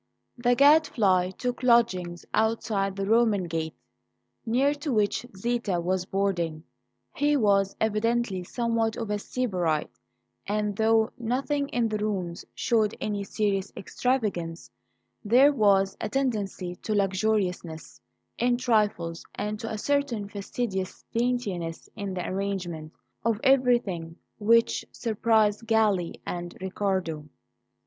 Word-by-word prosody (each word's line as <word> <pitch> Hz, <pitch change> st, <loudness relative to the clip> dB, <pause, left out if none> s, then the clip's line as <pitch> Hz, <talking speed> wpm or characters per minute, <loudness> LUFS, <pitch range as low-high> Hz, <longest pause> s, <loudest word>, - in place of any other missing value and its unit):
THE 245 Hz, 0 st, +2 dB
Gadfly 240 Hz, -, +4 dB
took 250 Hz, 0 st, -3 dB
lodgings 190 Hz, -8 st, +2 dB
outside 215 Hz, -3 st, 0 dB
the 195 Hz, 0 st, -2 dB
Roman 220 Hz, -2 st, +3 dB
gate, 160 Hz, -2 st, -3 dB, 0.7 s
near 265 Hz, +5 st, +3 dB
to 290 Hz, 0 st, -4 dB
which 215 Hz, +1 st, +1 dB
Zita 230 Hz, -4 st, -1 dB
was 185 Hz, +1 st, -1 dB
boarding. 175 Hz, -5 st, -1 dB, 0.5 s
He 290 Hz, 0 st, +2 dB
was 200 Hz, -4 st, +2 dB
evidently 220 Hz, -2 st, 0 dB
somewhat 230 Hz, +2 st, -1 dB
of 225 Hz, -3 st, -3 dB
a 210 Hz, -, 0 dB
sybarite; 180 Hz, -11 st, -1 dB, 0.6 s
and, 210 Hz, 0 st, -1 dB
though 220 Hz, +1 st, +3 dB
nothing 275 Hz, +5 st, -1 dB
in 240 Hz, -2 st, +1 dB
the 215 Hz, -1 st, -2 dB
rooms 190 Hz, -5 st, -3 dB
showed 220 Hz, -3 st, +1 dB
any 205 Hz, -1 st, -2 dB
serious 200 Hz, -1 st, -1 dB
extravagance, 200 Hz, -9 st, -2 dB, 0.5 s
there 255 Hz, +7 st, +5 dB
was 195 Hz, -5 st, +3 dB
a 215 Hz, -, -2 dB
tendency 205 Hz, -8 st, -2 dB
to 215 Hz, -, -3 dB
luxuriousness 190 Hz, -, -1 dB, 0.4 s
in 245 Hz, 0 st, +2 dB
trifles 210 Hz, -9 st, 0 dB
and 210 Hz, +1 st, -3 dB
to 225 Hz, -, -5 dB
a 220 Hz, -, -3 dB
certain 270 Hz, -4 st, 0 dB
fastidious 200 Hz, -1 st, -4 dB
daintiness 215 Hz, -9 st, -2 dB
in 200 Hz, -3 st, -4 dB
the 180 Hz, -, -3 dB
arrangement 185 Hz, -5 st, -3 dB, 0.3 s
of 225 Hz, -2 st, +1 dB
everything 240 Hz, -11 st, +2 dB, 0.2 s
which 230 Hz, +2 st, +3 dB
surprised 220 Hz, -1 st, +1 dB
Galli 210 Hz, -6 st, +2 dB
and 175 Hz, 0 st, -5 dB
Riccardo. 185 Hz, -5 st, -2 dB
210 Hz, 120 wpm, -27 LUFS, 185-235 Hz, 0.7 s, there